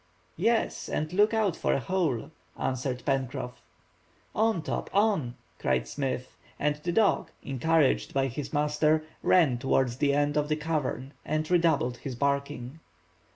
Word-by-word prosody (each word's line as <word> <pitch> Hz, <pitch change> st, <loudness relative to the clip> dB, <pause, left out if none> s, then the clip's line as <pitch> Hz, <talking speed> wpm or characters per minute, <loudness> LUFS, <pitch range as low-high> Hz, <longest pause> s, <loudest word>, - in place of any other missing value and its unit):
"Yes, 225 Hz, +6 st, +1 dB
and 155 Hz, +3 st, -2 dB
look 205 Hz, +3 st, +4 dB
out 215 Hz, -6 st, +1 dB
for -, -, 0 dB
a -, -, +1 dB
hole," 155 Hz, -5 st, -1 dB, 0.3 s
answered 130 Hz, -1 st, -2 dB
Pencroff. 130 Hz, -3 st, -2 dB, 0.7 s
"On, 220 Hz, -6 st, +1 dB
Top, -, -, -3 dB
on," 195 Hz, -, +2 dB, 0.2 s
cried 65 Hz, -2 st, 0 dB
Smith, 130 Hz, -, -3 dB, 0.2 s
and 150 Hz, 0 st, +1 dB
the 175 Hz, +4 st, -3 dB
dog, 195 Hz, -4 st, +2 dB
encouraged 140 Hz, +2 st, +2 dB
by 135 Hz, -1 st, +1 dB
his 135 Hz, +2 st, -4 dB
master, 150 Hz, +1 st, +2 dB, 0.2 s
ran 150 Hz, -10 st, +4 dB
towards 130 Hz, -2 st, +1 dB
the 140 Hz, 0 st, +2 dB
end 145 Hz, 0 st, +1 dB
of 150 Hz, 0 st, +1 dB
the 155 Hz, -, +2 dB
cavern, 150 Hz, -4 st, -2 dB
and 155 Hz, +2 st, -2 dB
redoubled 160 Hz, -8 st, +2 dB
his 130 Hz, +1 st, -6 dB
barking. 140 Hz, +1 st, -2 dB
145 Hz, 145 wpm, -28 LUFS, 130-165 Hz, 0.7 s, look